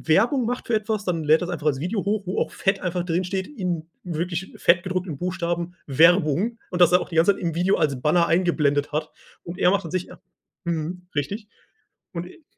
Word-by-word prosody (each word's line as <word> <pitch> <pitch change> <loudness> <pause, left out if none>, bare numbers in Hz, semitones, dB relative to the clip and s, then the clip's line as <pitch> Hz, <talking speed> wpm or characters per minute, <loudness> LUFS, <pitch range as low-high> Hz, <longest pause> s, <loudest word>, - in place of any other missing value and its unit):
Werbung 240 +4 +3
macht 245 +2 -3
für 235 - -1
etwas, 215 -1 -1
dann 165 -3 -1
lädt 155 +2 +5
er 180 - -2
das - - -7
einfach 155 -3 -3
als 135 -3 +1
Video 190 +6 -2
hoch, 205 0 -1
wo 185 - -1
auch - - -1
fett 195 0 0
einfach 180 -1 -2
drinsteht, 185 +2 -1
in 180 - -3 0.2
wirklich 175 +2 -3
fett 170 0 +4
gedruckten 185 -5 -3
Buchstaben 175 0 -2
„Werbung" 175 - +4
und 180 0 -1
das 175 0 +7
er 180 - +6
auch - - -5
die 165 - -7
ganze 170 +5 +5
Zeit - - -10
im 165 -2 -2
Video 180 +3 +2
als 140 -6 0
Banner 170 +4 +3
eingeblendet 150 -5 +2
hat. 155 +1 -2 0.3
Und 170 +1 -7
er 180 - +5
macht 200 -4 0
an 165 - -7
sich 185 -1 -2
h - - -13 0.5
mhm, 170 +2 -3
richtig. 200 +10 -3 0.7
Und 175 +1 -4
e 310 - -16
175 Hz, 220 wpm, -24 LUFS, 165-190 Hz, 0.7 s, das